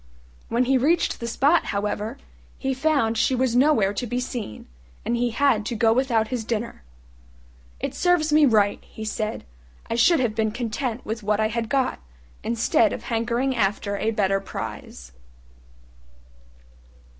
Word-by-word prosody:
When 235 +2 +2
he 265 +1 +3
reached 320 +7 +1
the 235 - -4
spot, 285 +8 +3
however, 210 +4 -3 0.4
he 270 -1 -1
found 265 -5 +1
she 260 - +2
was 250 -1 +1
nowhere 245 -7 +4
to 240 +4 -3
be 245 +2 -2
seen, 245 - -5 0.4
and 235 - 0
he 240 0 +1
had 235 -2 +2
to 240 - -3
go 225 0 +3
without 230 -3 +1
his 250 -3 -2
dinner. 230 +1 -3 1.0
"It - - -3
serves 345 -4 +2
me 305 -1 +6
right," 210 -4 +3
he 220 - -9
said; 215 - -3 0.5
"I - - +2
should 250 +8 +4
have 240 -4 0
been 220 -1 0
content 240 +1 -3
with 220 +1 -4
what 210 0 0
I 215 0 +2
had 230 0 -3
got, 265 0 0 0.4
instead 230 -1 +2
of - - -6
hankering 240 +3 -1
after 200 -1 0
a 210 +2 -1
better 195 -3 +1
prize." 65 - -7
235 Hz, 155 wpm, -24 LUFS, 215-260 Hz, 1.0 s, me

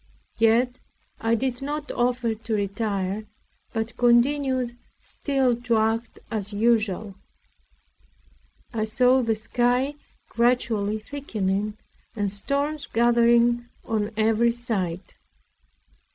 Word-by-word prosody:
Yet 235 +3 +3 0.4
I 225 +1 +2
did 250 +1 -2
not 295 +1 -4
offer 245 -1 0
to 220 0 -3
retire, 200 0 -2 0.4
but 225 -1 -3
continued 250 0 +2 0.2
still 270 -4 0
to 240 -2 +1
act 225 +2 0
as 210 -2 -3
usual. 215 -2 +1 1.6
I 220 -2 -1
saw 250 +4 +3
the 225 -2 +1
sky 245 +5 +1 0.3
gradually 230 -3 +1
thickening 215 -5 -3 0.4
and 205 -3 0
storms 280 +7 -1
gathering 235 +1 +3 0.2
on 215 -2 -1
every 225 +2 +3
side. 195 -7 -3
235 Hz, 95 wpm, -25 LUFS, 215-245 Hz, 1.6 s, Yet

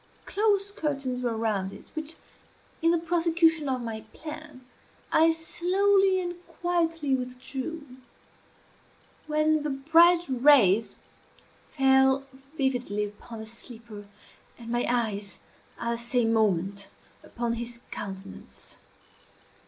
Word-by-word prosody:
Close 405 -1 +1
curtains 275 -8 -2
were 235 -3 -1
around 205 -4 -1
it, - - -12
which, 315 0 -3 0.7
in 330 - +4
the 340 - +4
prosecution 330 -2 +2
of 255 -2 -1
my 220 -1 -5
plan, 300 -4 -9 0.5
I 320 +1 +5
slowly 375 +4 +2
and 350 -1 -5
quietly 330 -5 -1
withdrew, 260 +4 -4 1.4
when 305 0 +2
the 300 - -2
bright 330 +5 +5
rays 245 -6 +4 0.7
fell 265 0 +3 0.3
vividly 250 -6 0
upon 220 +2 -10
the - - -7
sleeper, 225 -2 -8 0.5
and 230 -1 -10
my 240 0 0
eyes 210 -6 -1 0.4
at 235 0 -2
the 235 - -1
same 235 -1 +1
moment 200 -2 +1 0.3
upon 235 -1 -3
his 235 0 -5
countenance. 190 - -8
265 Hz, 110 wpm, -27 LUFS, 230-325 Hz, 1.4 s, I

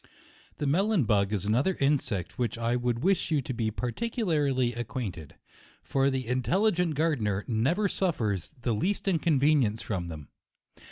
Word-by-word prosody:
The 150 - -2
melon 190 +4 +2
bug 100 -3 +2
is 100 -3 -2
another 130 - +2
insect 135 - +1
with - - -21
which 120 -2 -1
I 115 +1 0
would 120 0 -1
wish 190 -1 +2
you 155 -3 +2
to 130 - -4
be 115 -2 -1
particularly 140 - 0
acquain 120 -2 -3
ted; 80 -4 -11 0.5
for 135 0 +1
the 130 -1 -2
intelligent 170 - +1
gardener 120 -11 0
never 135 - +1
suf 185 -3 0
fers 100 -6 -2
the 120 -1 -1
least 190 - -1
inconvenience 145 - +2
from 90 -5 -3
them. 75 -4 -8
130 Hz, 160 wpm, -28 LUFS, 110-165 Hz, 0.5 s, melon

